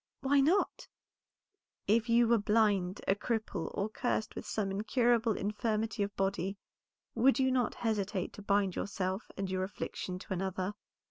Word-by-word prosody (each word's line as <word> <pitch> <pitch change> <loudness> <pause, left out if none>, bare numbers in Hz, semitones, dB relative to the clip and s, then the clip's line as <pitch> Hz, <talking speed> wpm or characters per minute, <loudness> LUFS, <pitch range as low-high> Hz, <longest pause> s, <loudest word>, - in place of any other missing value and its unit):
"Why 275 +1 +3
not?" 330 +9 +2 1.0
"If 225 +3 +2
you 235 0 +5
were 235 0 +4
blind, 205 -3 +2
a - - +5
cripple, 215 -4 -2
or 200 - 0
cursed 220 0 -2
with - - -7
some 200 -3 -1
incurable 230 +2 +2
infirmity 215 +1 -1
of 200 0 -2
body, 195 0 -1 0.6
would 260 +4 +4
not 260 -3 +2
you - - -14
hesitate 210 -4 -1
to - - -9
bind 200 -2 +1
yourself 190 0 -3
and 195 0 -2
your 185 0 -1
affliction 185 -1 -4
to 190 - -6
another?" 190 +1 -2
210 Hz, 150 wpm, -32 LUFS, 195-230 Hz, 1.0 s, you